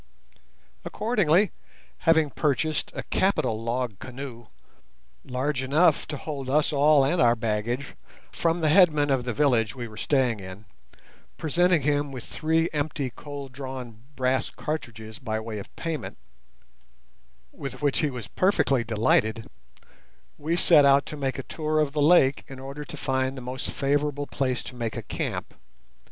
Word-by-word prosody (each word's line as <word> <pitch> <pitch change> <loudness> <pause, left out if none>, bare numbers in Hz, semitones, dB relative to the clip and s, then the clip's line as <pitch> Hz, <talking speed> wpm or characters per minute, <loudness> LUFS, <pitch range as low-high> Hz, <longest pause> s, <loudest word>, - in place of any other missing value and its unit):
Accordingly, 205 -4 +2 0.6
having 160 -3 +4
purchased 150 +4 0
a - - -4
capital 125 - 0
log 115 -3 -2
canoe, 130 -3 -8 0.8
large 130 +2 -2
enough 150 +4 +3
to 150 - -4
hold 140 -3 -5
us 150 +3 +2
all 145 -1 +5
and 165 +6 +1
our 120 -1 +5
baggage, 115 +4 -2 0.4
from 165 0 0
the 155 - +3
headman 150 -5 +5
of 130 -2 +1
the 125 - -1
village 120 -5 +2
we 120 -2 -5
were 110 -1 -12
staying 130 -6 +1
in, 95 +2 -10 0.7
presenting 170 0 +2
him 145 0 +1
with 125 -4 -7
three 160 +1 0
empty 145 -3 -2
cold 140 +1 -8
drawn 130 -4 -7
brass 130 0 0
cartridges 110 -8 -6
by 110 -3 -2
way 110 -1 -5
of 100 - -11
payment, 150 - -4 1.3
with 135 -1 -7
which 145 -2 +2
he 150 - +1
was 125 -4 -7
perfectly 140 -10 +2
delighted, 110 0 +1 0.9
we 160 +4 -1
set 160 -4 +6
out 140 0 +5
to - - -6
make 135 -2 -2
a 135 - -4
tour 155 +2 -2
of 150 -2 +1
the 150 - 0
lake 145 -3 +5
in 135 - -9
order 140 +2 -7
to - - -9
find 130 0 -1
the - - -4
most 125 +1 -5
favourable 145 +1 0
place 130 -3 -2
to - - -8
make 115 -2 -3
a - - -4
camp. - - -4
135 Hz, 155 wpm, -26 LUFS, 120-150 Hz, 1.3 s, set